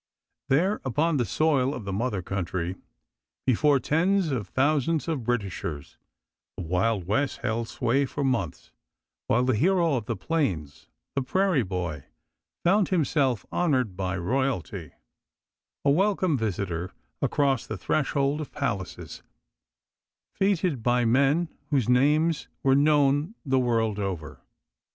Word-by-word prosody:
There, 180 Hz, +10 st, +2 dB
upon 150 Hz, +5 st, +1 dB
the 120 Hz, -, +1 dB
soil 140 Hz, -, +1 dB
of 110 Hz, -, -7 dB
the 100 Hz, -, -3 dB
mother 105 Hz, -3 st, -1 dB
country, 90 Hz, -1 st, -3 dB, 0.7 s
before 140 Hz, +3 st, +3 dB
tens 170 Hz, +5 st, +1 dB
of 115 Hz, -7 st, -2 dB
thousands 150 Hz, -, +1 dB
of 155 Hz, -7 st, -2 dB
Britishers, 95 Hz, -11 st, -3 dB, 0.6 s
the -, -, -4 dB
Wild 90 Hz, +3 st, 0 dB
West 135 Hz, +9 st, -1 dB
held 115 Hz, +1 st, -1 dB
sway 135 Hz, +5 st, +1 dB
for 145 Hz, -, -3 dB
months, 120 Hz, -11 st, -2 dB, 0.6 s
while 120 Hz, +2 st, +3 dB
the 130 Hz, -2 st, +2 dB
hero 170 Hz, -, +2 dB
of 120 Hz, -5 st, -2 dB
the -, -, -1 dB
plains, 85 Hz, -, -2 dB, 0.3 s
the 140 Hz, -, 0 dB
prairie 185 Hz, +2 st, +2 dB
boy, 90 Hz, -, -4 dB, 0.6 s
found 195 Hz, +3 st, +3 dB
himself 140 Hz, -, +1 dB
honored 130 Hz, -, +1 dB
by 95 Hz, 0 st, -2 dB
royalty, 95 Hz, -, -2 dB, 0.9 s
a 140 Hz, -, +5 dB
welcome 185 Hz, 0 st, +2 dB
visitor 95 Hz, -6 st, -2 dB, 0.3 s
across 140 Hz, -4 st, +1 dB
the 110 Hz, -, -4 dB
threshold 140 Hz, -, 0 dB
of 150 Hz, -, -7 dB
palaces, 105 Hz, -11 st, -4 dB, 1.1 s
fêted 185 Hz, -, +1 dB
by 120 Hz, +1 st, +2 dB
men 140 Hz, +8 st, +3 dB, 0.2 s
whose 135 Hz, -7 st, +1 dB
names 150 Hz, +6 st, +3 dB, 0.2 s
were 135 Hz, -, +4 dB
known 145 Hz, +5 st, +3 dB
the 135 Hz, -1 st, +2 dB
wide 125 Hz, -, 0 dB
world 115 Hz, -3 st, +1 dB
over. 90 Hz, -7 st, -4 dB
130 Hz, 130 wpm, -26 LUFS, 100-150 Hz, 1.1 s, a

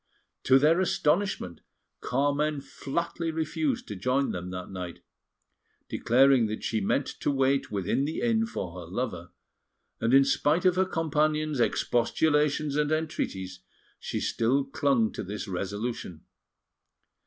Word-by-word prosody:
To 130 Hz, -, +6 dB
their 155 Hz, +5 st, +4 dB
astonishment, 185 Hz, -, 0 dB, 0.4 s
Carmen 145 Hz, +3 st, 0 dB
flatly 165 Hz, +4 st, -4 dB
refused 240 Hz, -, -2 dB
to -, -, -5 dB
join 135 Hz, +2 st, 0 dB
them 90 Hz, 0 st, -5 dB
that 90 Hz, 0 st, -6 dB
night, 90 Hz, -2 st, -7 dB, 0.9 s
declaring 130 Hz, -1 st, +4 dB
that 110 Hz, +1 st, -5 dB
she 110 Hz, -2 st, -1 dB
meant 130 Hz, +8 st, +1 dB
to -, -, 0 dB
wait 135 Hz, 0 st, +1 dB
within 105 Hz, +7 st, 0 dB
the 155 Hz, -, -3 dB
inn 225 Hz, -1 st, +2 dB
for 90 Hz, -, -5 dB
her 85 Hz, -, -9 dB
lover; 100 Hz, -6 st, -3 dB, 0.7 s
and 115 Hz, -, +1 dB
in 135 Hz, +1 st, +6 dB
spite 150 Hz, +5 st, +1 dB
of 180 Hz, -1 st, +5 dB
her 190 Hz, +1 st, +3 dB
companions' 155 Hz, -3 st, 0 dB
expostulations 150 Hz, +5 st, +1 dB
and 150 Hz, 0 st, +1 dB
entreaties, 95 Hz, -, -2 dB, 0.4 s
she -, -, -3 dB
still 130 Hz, +5 st, +1 dB
clung 135 Hz, -5 st, +1 dB
to -, -, -5 dB
this 105 Hz, +3 st, -5 dB
resolution. 100 Hz, -1 st, -4 dB
140 Hz, 130 wpm, -28 LUFS, 110-155 Hz, 0.9 s, To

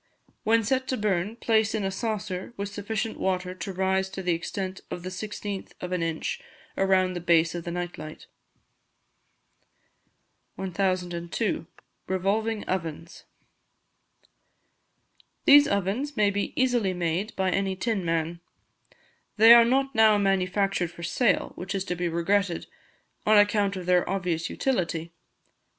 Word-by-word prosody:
When 225 Hz, +1 st, +3 dB
set 260 Hz, +4 st, 0 dB
to 260 Hz, -, -1 dB
burn, 205 Hz, 0 st, 0 dB
place 220 Hz, -2 st, +1 dB
in 215 Hz, -, -1 dB
a 195 Hz, -, -1 dB
saucer, 205 Hz, -1 st, -4 dB
with 200 Hz, 0 st, -3 dB
sufficient 215 Hz, +2 st, -4 dB
water 185 Hz, -1 st, -1 dB
to 185 Hz, +1 st, -6 dB
rise 190 Hz, +1 st, 0 dB
to 190 Hz, 0 st, -6 dB
the 180 Hz, -1 st, +2 dB
extent 185 Hz, +3 st, -4 dB
of 175 Hz, -, -6 dB
the 185 Hz, -, -4 dB
16th 205 Hz, +1 st, -6 dB
of 180 Hz, -, -6 dB
an 180 Hz, -1 st, -1 dB
inch 165 Hz, -, -2 dB, 0.3 s
around 190 Hz, -1 st, +2 dB
the 175 Hz, -, -4 dB
base 170 Hz, -1 st, +3 dB
of 175 Hz, -1 st, -5 dB
the -, -, -3 dB
night 175 Hz, 0 st, -4 dB
light. 155 Hz, 0 st, -9 dB, 2.3 s
1002. 185 Hz, 0 st, -2 dB, 0.4 s
Revolving 205 Hz, +4 st, 0 dB
Ovens. 165 Hz, 0 st, -4 dB, 2.2 s
These 285 Hz, 0 st, +8 dB
ovens 200 Hz, +9 st, -1 dB
may 205 Hz, -1 st, +3 dB
be 200 Hz, 0 st, -3 dB
easily 240 Hz, -7 st, +2 dB
made 175 Hz, +5 st, -2 dB
by 190 Hz, -1 st, +1 dB
any 195 Hz, 0 st, 0 dB
tin 205 Hz, 0 st, -1 dB
man. 165 Hz, 0 st, -1 dB, 1.0 s
They 225 Hz, +2 st, +9 dB
are 235 Hz, 0 st, +9 dB
not 270 Hz, +3 st, +1 dB
now 220 Hz, -2 st, +5 dB
manufactured 195 Hz, -2 st, +1 dB
for 170 Hz, 0 st, -11 dB
sale, 200 Hz, +6 st, +1 dB
which 185 Hz, +3 st, -5 dB
is 195 Hz, -, -1 dB
to 180 Hz, -, -2 dB
be 175 Hz, 0 st, -1 dB
regretted, 175 Hz, +2 st, 0 dB, 0.6 s
on 215 Hz, 0 st, +6 dB
account 205 Hz, -1 st, +3 dB
of 185 Hz, -2 st, -6 dB
their 180 Hz, 0 st, +2 dB
obvious 175 Hz, -4 st, -1 dB
utility. 170 Hz, -10 st, -1 dB
190 Hz, 140 wpm, -26 LUFS, 180-215 Hz, 2.3 s, They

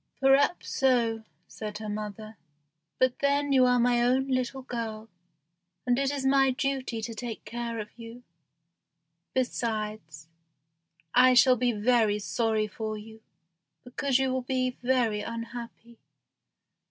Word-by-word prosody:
"Perhaps 275 Hz, +5 st, +3 dB
so," 235 Hz, -4 st, +2 dB, 0.2 s
said 210 Hz, -1 st, -7 dB
her 215 Hz, 0 st, -7 dB
mother; 215 Hz, +1 st, -6 dB, 0.6 s
"but 255 Hz, -1 st, +1 dB
then 285 Hz, 0 st, +1 dB
you 260 Hz, -1 st, +6 dB
are 250 Hz, 0 st, +3 dB
my 240 Hz, 0 st, +3 dB
own 260 Hz, +3 st, +2 dB
little 255 Hz, +1 st, -1 dB
girl, 225 Hz, -3 st, -5 dB, 0.8 s
and 245 Hz, 0 st, +2 dB
it 275 Hz, -1 st, +1 dB
is 280 Hz, -1 st, -3 dB
my 270 Hz, 0 st, +4 dB
duty 260 Hz, -3 st, -2 dB
to 230 Hz, -, -4 dB
take 230 Hz, 0 st, -6 dB
care 235 Hz, +1 st, -4 dB
of 210 Hz, -1 st, -7 dB
you. 230 Hz, +1 st, -11 dB, 1.1 s
Besides, 215 Hz, -, -3 dB, 0.9 s
I 255 Hz, +1 st, +6 dB
shall 255 Hz, +1 st, +6 dB
be 245 Hz, 0 st, +1 dB
very 220 Hz, -1 st, +2 dB
sorry 220 Hz, +1 st, 0 dB
for 215 Hz, +1 st, -5 dB
you, 220 Hz, +1 st, -12 dB, 0.6 s
because 255 Hz, +1 st, 0 dB
you 265 Hz, -1 st, 0 dB
will 260 Hz, -, -1 dB
be 255 Hz, 0 st, -1 dB
very 240 Hz, -4 st, +1 dB
unhappy. 230 Hz, 0 st, -8 dB
240 Hz, 130 wpm, -28 LUFS, 220-255 Hz, 1.1 s, you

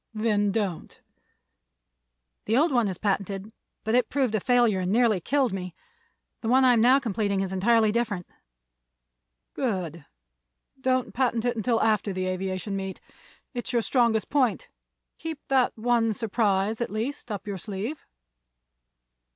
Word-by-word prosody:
"Then 210 Hz, -2 st, +1 dB
don't." 200 Hz, -5 st, -3 dB, 1.5 s
"The 225 Hz, +3 st, +2 dB
old 315 Hz, +3 st, +3 dB
one 240 Hz, -4 st, +2 dB
is 185 Hz, -3 st, -3 dB
patented, 195 Hz, 0 st, -2 dB, 0.3 s
but 220 Hz, -, -1 dB
it 250 Hz, 0 st, +3 dB
proved 260 Hz, -5 st, 0 dB
a 215 Hz, -, +2 dB
failure 240 Hz, -3 st, +3 dB
and 185 Hz, 0 st, -1 dB
nearly 225 Hz, -3 st, +3 dB
killed 265 Hz, -, +1 dB
me. 180 Hz, -2 st, -5 dB, 0.7 s
The 225 Hz, -, -4 dB
one 260 Hz, +2 st, +5 dB
I 250 Hz, -, +6 dB
am 230 Hz, -, +3 dB
now 250 Hz, +3 st, +6 dB
completing 205 Hz, -6 st, -1 dB
is 190 Hz, -1 st, -3 dB
entirely 220 Hz, +3 st, +3 dB
different." 210 Hz, -6 st, -1 dB, 1.3 s
"Good. 180 Hz, -, -3 dB, 0.7 s
Don't 255 Hz, -1 st, 0 dB
patent 240 Hz, -2 st, 0 dB
it 245 Hz, 0 st, +1 dB
until 225 Hz, +1 st, +1 dB
after 215 Hz, -2 st, +1 dB
the 185 Hz, 0 st, -2 dB
aviation 185 Hz, +1 st, -3 dB
meet. 190 Hz, -1 st, -4 dB, 0.5 s
It's 245 Hz, 0 st, -4 dB
your 235 Hz, -2 st, +2 dB
strongest 235 Hz, -4 st, +2 dB
point. 285 Hz, -, +1 dB, 0.5 s
Keep 325 Hz, -2 st, -5 dB
that 265 Hz, -3 st, +2 dB
one 230 Hz, -1 st, +2 dB
surprise, 210 Hz, -1 st, 0 dB
at 235 Hz, -, -1 dB
least, 230 Hz, +4 st, -4 dB
up 200 Hz, -3 st, -5 dB
your 200 Hz, -2 st, -4 dB
sleeve." 210 Hz, -, -5 dB
220 Hz, 145 wpm, -26 LUFS, 195-245 Hz, 1.5 s, I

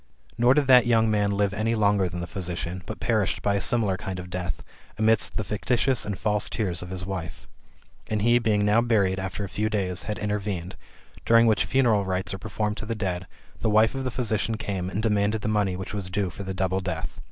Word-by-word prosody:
Nor 120 Hz, +3 st, +4 dB
did 150 Hz, -, +3 dB
that 125 Hz, -2 st, +6 dB
young 115 Hz, -2 st, +3 dB
man 105 Hz, -1 st, +2 dB
live 100 Hz, 0 st, +1 dB
any 110 Hz, +2 st, 0 dB
longer 100 Hz, -3 st, +2 dB
than 90 Hz, 0 st, -5 dB
the -, -, -3 dB
physician, 90 Hz, -1 st, -4 dB
but -, -, -6 dB
perished 110 Hz, -4 st, 0 dB
by 100 Hz, -, +2 dB
a 100 Hz, -, 0 dB
similar 105 Hz, -2 st, +1 dB
kind 95 Hz, -2 st, -5 dB
of 90 Hz, 0 st, -9 dB
death, 90 Hz, -2 st, -4 dB, 0.3 s
amidst 110 Hz, 0 st, +2 dB
the 110 Hz, -, -1 dB
fictitious 120 Hz, +5 st, 0 dB
and 100 Hz, -2 st, -3 dB
false 105 Hz, +1 st, 0 dB
tears 90 Hz, -7 st, -1 dB
of 90 Hz, -, -7 dB
his 90 Hz, 0 st, -5 dB
wife. 90 Hz, -4 st, -6 dB, 0.6 s
And 105 Hz, -1 st, -1 dB
he, 120 Hz, +1 st, +5 dB
being 105 Hz, -3 st, +1 dB
now 105 Hz, +3 st, +4 dB
buried, 100 Hz, -6 st, +2 dB
after 95 Hz, +2 st, -4 dB
a -, -, -3 dB
few 105 Hz, +3 st, -1 dB
days^^ 95 Hz, -4 st, -1 dB
had 105 Hz, -, -3 dB
intervened, 100 Hz, -4 st, -3 dB, 0.5 s
during 115 Hz, 0 st, +5 dB
which 110 Hz, -2 st, +3 dB
funeral 120 Hz, -6 st, +3 dB
rites 95 Hz, +1 st, -2 dB
are 95 Hz, -, -5 dB
performed 105 Hz, +1 st, -3 dB
to 110 Hz, -, -6 dB
the 115 Hz, -, -2 dB
dead, 95 Hz, -3 st, -3 dB, 0.3 s
the -, -, 0 dB
wife 110 Hz, +1 st, +4 dB
of 135 Hz, 0 st, -3 dB
the 130 Hz, -, -1 dB
physician 115 Hz, -3 st, -1 dB
came 95 Hz, -4 st, -3 dB
and 105 Hz, +3 st, -3 dB
demanded 105 Hz, 0 st, +1 dB
the -, -, -1 dB
money 105 Hz, -3 st, +1 dB
which 95 Hz, +3 st, -6 dB
was 100 Hz, -3 st, -3 dB
due 95 Hz, -1 st, -1 dB
for 95 Hz, -, -9 dB
the 95 Hz, -1 st, -4 dB
double 95 Hz, 0 st, 0 dB
death. 80 Hz, -3 st, -4 dB
105 Hz, 225 wpm, -25 LUFS, 95-110 Hz, 0.6 s, that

